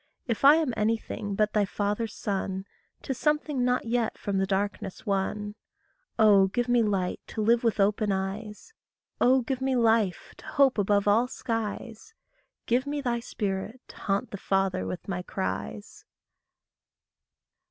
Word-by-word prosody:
If 230 -1 -2
I 285 +2 +9
am 315 -6 0
anything 215 -2 -1
but 210 +1 +1
thy 210 - +3
father's 210 +3 -2
son, 190 -1 -3 0.4
'Tis 265 -2 -4
something 300 -3 +1
not 250 0 +1
yet 235 -1 0
from 200 -1 -2
the 195 - +1
darkness 195 -1 -2
won. 205 +1 -1 0.6
Oh, 205 -3 +6
give 240 +5 -1
me 245 -1 +4
light 195 -4 0
to 220 - -4
live 235 +2 +3
with 225 -3 +1
open 205 +1 +2
eyes. 210 - -4 0.5
Oh, 260 +1 +5
give 260 +1 -3
me 265 0 +1
life 225 -5 +1
to - - -14
hope 270 -5 +3
above 200 0 +2
all 225 +4 +4
skies. 230 - -5 0.5
Give 250 +4 +1
me 290 0 -2
thy 245 -4 -1
spirit 210 0 -4
to - - -13
haunt 200 -1 -1
the 200 - -5
Father 195 -1 0
with 180 - -6
my 180 -2 -2
cries. 95 - -5
215 Hz, 155 wpm, -27 LUFS, 195-245 Hz, 0.6 s, I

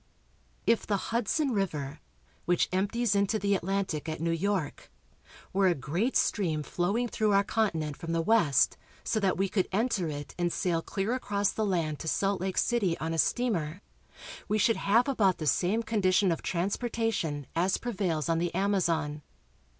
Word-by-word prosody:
If 230 0 +2
the 205 - +1
Hudson 250 +6 +1
river, 155 - -2 0.5
which 175 0 +2
empties 205 +4 +1
into 200 +2 +2
the 200 -1 +1
Atlantic 190 -5 -1
at 155 - -4
New 165 +1 0
York, 175 -2 -2 0.6
were 195 0 +3
a 175 - +3
great 170 - -1
stream 160 -7 0
flowing 200 +11 -1
through 215 -2 +1
our 200 0 +4
con 220 +1 +1
tinent 155 -4 -4
from 165 - -5
the 165 0 0
west, 170 - +3 0.3
so 225 - 0
that 195 -3 +1
we 195 +1 +1
could 190 -1 0
enter 210 -4 0
it 145 -2 -6
and 175 0 +1
sail 170 -3 0
clear 195 +6 -2
across 205 -5 0
the 215 -1 -1
land 165 -6 -1
to 160 - -6
Salt 195 +3 0
Lake 190 0 -2
City 205 -8 +1
on 160 +1 -3
a 165 - -1
steamer, 185 -8 0 0.6
we 215 - +1
should 225 +2 +3
have 230 +6 +3
about 205 -9 +2
the 155 - -4
same 190 +9 +1
condition 195 -4 +2
of 165 - -2
transportation 195 - -1
as 180 +3 +2
prevails 185 -10 -2
on 165 -1 +1
the 175 0 -1
Amazon. 170 -6 0
190 Hz, 175 wpm, -29 LUFS, 165-215 Hz, 0.6 s, our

